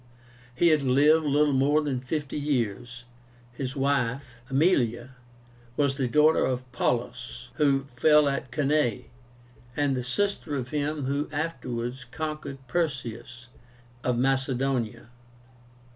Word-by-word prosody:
He 170 +6 +4
had 155 -2 +4
lived 145 +4 +4
little 145 0 +3
more 140 +3 +3
than 135 -4 -1
fifty 145 +3 -3
years. 120 -4 -2 0.5
His 130 +2 -5
wife, 135 -1 0 0.2
Aemilia, 130 -5 +1 0.7
was 140 -2 +2
the 135 -2 -1
daughter 150 +5 +4
of 130 0 -1
Paullus, 125 0 -2
who 140 -3 +3
fell 145 +3 +4
at 140 -2 -2
Cannae, 145 -5 0 0.7
and 145 -2 +1
the 125 - -2
sister 155 +3 -1
of 130 -2 -3
him 150 -1 -2
who 140 +2 -1
afterwards 130 -5 -4
conquered 155 +1 -5
Perseus 120 -6 -3 0.5
of 125 -1 0
Macedonia. 130 -3 0
135 Hz, 115 wpm, -27 LUFS, 125-150 Hz, 0.7 s, He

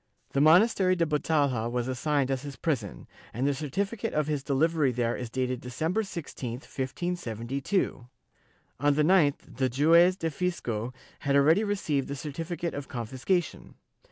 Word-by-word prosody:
The 140 - +1
monastery 185 +4 +5
da 170 -2 +1
Batalha 145 -6 +1
was 120 0 -2
assigned 135 +1 0
as 130 -1 -1
his 140 -1 -7
prison, 115 - -3 0.3
and 125 +3 0
the 145 - +2
certificate 190 - -3
of 150 -1 +2
his 150 -2 -1
delivery 145 +1 +2
there 120 -1 0
is 125 -2 -5
dated 125 0 -2
Decem 155 +7 -2
ber 220 - +2
16, 160 - -6
1572; 130 - -3 0.7
on 145 +1 +3
the 150 - +3
9th 155 -4 +2
the 130 -1 +1
juez 165 +8 +5
do 165 -3 -2
fisco 125 -10 -2 0.3
had 140 0 0
already 155 +9 +5
received 170 -10 -1
the 140 - -4
certificate 165 +4 -4
of 145 -1 -5
confiscation. 130 - -2
145 Hz, 155 wpm, -28 LUFS, 130-170 Hz, 0.7 s, monastery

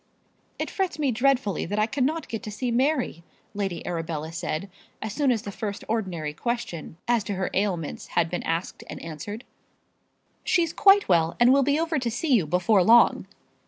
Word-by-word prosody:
"It - - -3
frets 380 -6 -1
me 290 -4 +1
dreadfully 245 - +1
that 205 - -3
I 215 - +3
cannot 280 +6 -1
get 225 - -4
to 215 -2 -7
see 240 +4 -2
Mary," 255 - +1 0.3
Lady 195 -4 -3
Arabella 165 -2 -3
said, 170 +1 -3 0.3
as 220 -2 -5
soon 285 -1 +2
as 225 -4 -1
the 200 - -5
first 205 0 -5
ordinary 185 -9 -2
question 175 -7 -4
as 235 -3 +2
to 200 - -3
her 190 0 -2
ailments 185 -6 -2
had 170 -1 +4
been 175 +2 -3
asked 165 +2 -3
and - - -6
answered. 185 - -7 1.0
"She's 335 -3 +1
quite 400 0 +5
well 165 -2 +2
and 245 +2 +6
will 275 - +5
be 285 +3 +2
over 325 -2 0
to 245 -2 -1
see 265 +5 0
you 195 -10 +3
before 180 +4 +3
long." 235 +4 +5
215 Hz, 185 wpm, -25 LUFS, 175-260 Hz, 1.0 s, and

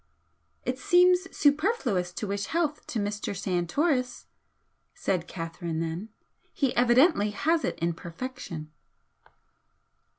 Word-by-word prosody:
"It 255 +1 -2
seems 360 -2 +4
superfluous 285 - +1
to 210 - -4
wish 200 0 -2
health 320 -3 -1
to - - -3
Mr. 205 -1 -2
Santoris," 250 - 0 0.7
said 180 -3 -1
Catherine 165 -1 -4
then 165 +6 -3 0.4
"He 275 -4 0
evidently 245 - +4
has 320 +10 +1
it - - -1
in 170 +1 0
perfection." 170 -3 -7
225 Hz, 105 wpm, -28 LUFS, -, 0.7 s, seems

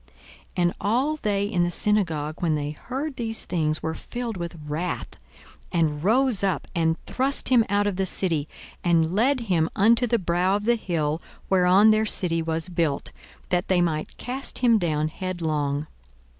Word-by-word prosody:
42:004:028 - - -14
And 175 -1 +2
all 255 +9 +1
they 200 -6 0
in 185 -4 +1
the 175 - +1
synagogue, 165 -6 +1
when 165 -3 +1
they 145 0 -2
heard 265 - -5
these 225 -2 -4
things, 155 -3 -1
were 160 - -1
filled 240 +4 -5
with 170 -1 -5
wrath, 160 +4 -3 0.6
42:004:029 170 - 0
And 150 -2 0
rose 235 0 +2
up, 195 -2 0
and 165 -1 0
thrust 270 +2 0
him 245 -3 +5
out 205 +1 +2
of 200 -3 -1
the 190 -1 0
city, 165 -6 0 0.4
and 165 -1 +2
led 250 +6 +2
him 175 -8 +1
unto 230 +5 +4
the 235 - +2
brow 180 0 +1
of 205 0 -3
the 240 - +4
hill 165 -8 -1 0.3
whereon 190 +3 +6
their 215 0 +2
city 165 -5 +2
was 160 +1 -2
built, 165 -5 -1 0.4
that 180 -1 0
they 185 -2 +2
might 160 -3 -1
cast 260 +3 -4
him 235 -3 +4
down 155 -4 0
headlong. 155 -5 -2
180 Hz, 175 wpm, -25 LUFS, 160-220 Hz, 0.6 s, whereon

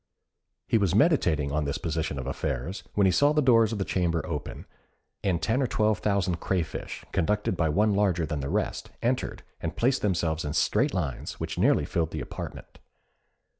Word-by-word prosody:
He 115 - +3
was 95 -3 +1
meditating 90 - +3
on 75 +1 0
this 70 - -2
position 80 -3 -2
of 65 - -4
affairs, 70 - -3
when 100 - +4
he 95 - +5
saw 145 +9 +4
the 150 - +2
doors 115 -4 +5
of 110 - -2
the 95 - -1
chamber 85 -3 0
open, 75 -4 -5 0.6
and 90 -4 +1
ten 115 +9 +1
or 130 - +2
twelve 110 -2 +1
thousand 95 -4 0
crayfish, 85 -4 -3
conducted 105 +1 0
by 85 -2 +1
one 105 +7 +3
larger 95 -5 +2
than 75 -1 -3
the 70 0 -3
rest, - - -2
entered, - - -1 0.2
and - - -4
placed 130 +3 +2
themselves 85 -5 0
in 75 - -3
straight 115 - +2
lines, 75 -9 -3
which - - -4
nearly - - +3
filled 80 -2 -1
the 80 - -5
apartment. 65 - -8
90 Hz, 185 wpm, -27 LUFS, 80-105 Hz, 0.6 s, he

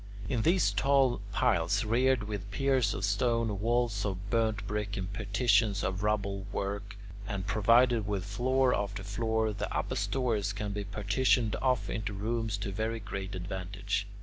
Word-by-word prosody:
In 115 +1 0
these 175 +8 +3
tall 135 -3 +2
piles - - +2
reared 125 +2 +2
with 105 -2 -5
piers 130 0 +1
of 100 - -1
stone, 110 0 +1
walls 115 -2 +1
of 100 -1 -4
burnt 110 -3 +1
brick, 105 -1 -3
and 95 +1 -4
partitions 105 0 +2
of 95 0 -2
rubble 100 -2 -1
work, 100 +1 -4 0.3
and 100 -3 -3
provided 115 +1 +4
with 100 -3 -2
floor 125 +6 +2
after 100 -1 -2
floor, 110 +2 0
the 105 +1 -4
upper - - -2
stories 110 -6 0
can 105 0 -4
be 100 0 -3
partitioned 105 +3 +1
off 125 -6 +1
into 105 +1 -3
rooms 110 +1 -2
to 100 -1 -4
very 110 +3 -2
great 95 -2 -5
advantage. 95 +2 -3
105 Hz, 155 wpm, -30 LUFS, 100-115 Hz, 0.3 s, provided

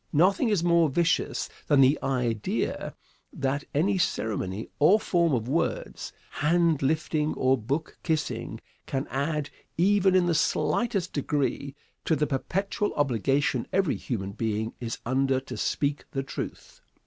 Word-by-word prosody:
Nothing 190 - +3
is 200 -6 +1
more 170 -2 +4
vicious 170 +4 +1 0.2
than 145 -2 +4
the 135 +3 +5
idea 120 -5 -1 0.4
that 135 +2 -2
any 185 +7 +1
ceremony 105 - -1
or 180 +9 +6
form 170 -5 +2
of 120 -4 0
words 170 - -2 0.2
hand 165 0 +2
lifting 155 +1 0
or 130 +1 +3
book 135 +7 -3
kissing 160 -3 -2 0.3
can 135 0 -2
add, 145 +2 -1 0.3
even 190 +1 +4
in 185 -1 +4
the 175 - +2
slightest 195 +4 0
degree, 140 -1 -1 0.3
to 160 - +3
the 150 +1 +1
perpetual 195 +9 -2
obligation 135 -1 +1
every 190 -5 +2
human 100 -6 -4
being 110 +1 -2
is 115 -2 -4
under 130 +1 +2
to 135 - -8
speak 145 0 -1
the 135 - -1
truth. 135 - -7
145 Hz, 135 wpm, -27 LUFS, 130-170 Hz, 0.4 s, or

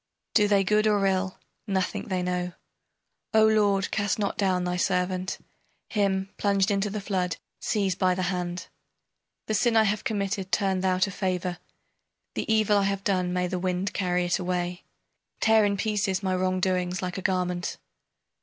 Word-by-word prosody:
Do 210 -2 +5
they 200 -1 +4
good 210 +3 +3
or 205 -2 +3
ill, 190 -1 0 0.3
nothing 190 -2 -1
they 185 -3 -1
know. 180 0 -2 0.8
O 220 0 +7
lord, 205 -3 +3
cast 205 -2 0
not 205 -2 -1
down 185 -3 +1
thy 180 0 -1
servant! 180 0 0 0.5
Him, 195 -2 0
plunged 200 -1 +2
into 200 +1 +1
the 210 +1 -3
flood, 185 -4 -1 0.2
seize 200 -4 0
by 185 0 +1
the 185 - -1
hand! 180 -1 -2 0.8
The 215 - -2
sin 230 +1 +3
I 220 - +6
have 210 -1 0
committed 200 -2 -2
turn 195 -2 +1
thou 185 0 +1
to 185 +2 +1
favor! 180 -2 -2 0.7
The - - -2
evil 215 -2 +4
I 200 - +1
have 195 0 -1
done 185 -3 +1
may 180 0 0
the 180 0 -2
wind 185 +2 -1
carry 180 -2 0
it 175 +2 +1
away! 180 -1 -2 0.5
Tear 220 -1 +5
in 200 -1 +1
pieces 205 -2 0
my 185 -1 +1
wrong 185 0 0
doings 180 -1 0
like 180 +1 -3
a - - -6
garment! 180 -1 -1
190 Hz, 175 wpm, -26 LUFS, 180-200 Hz, 0.8 s, O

